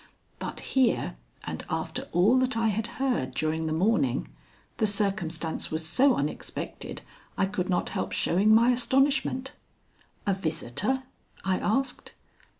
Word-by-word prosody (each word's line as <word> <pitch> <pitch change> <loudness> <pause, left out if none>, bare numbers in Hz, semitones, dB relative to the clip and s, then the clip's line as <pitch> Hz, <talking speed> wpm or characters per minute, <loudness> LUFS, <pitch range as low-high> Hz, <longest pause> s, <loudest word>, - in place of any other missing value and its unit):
But - - -5
here, 230 - +2 0.3
and - - -5
after - - -3
all 205 +9 +4
that 255 -2 +1
I 225 -1 +2
had 215 +2 -1
heard 245 - 0
during 160 +1 0
the - - -1
morning, 160 - +1 0.5
the 215 - +2
circumstance 190 -6 -1
was 160 +1 -2
so 255 - +4
unexpected 145 +2 -4 0.3
I - - +3
could 190 -2 -2
not 180 - +1
help - - -3
showing 195 +5 +3
my 230 +3 +6
astonishment. 265 +1 +2 0.7
"A 200 - +2
visitor?" 190 - -1 0.4
I 190 -1 +1
asked. 255 +4 -1
205 Hz, 135 wpm, -28 LUFS, 165-250 Hz, 0.7 s, my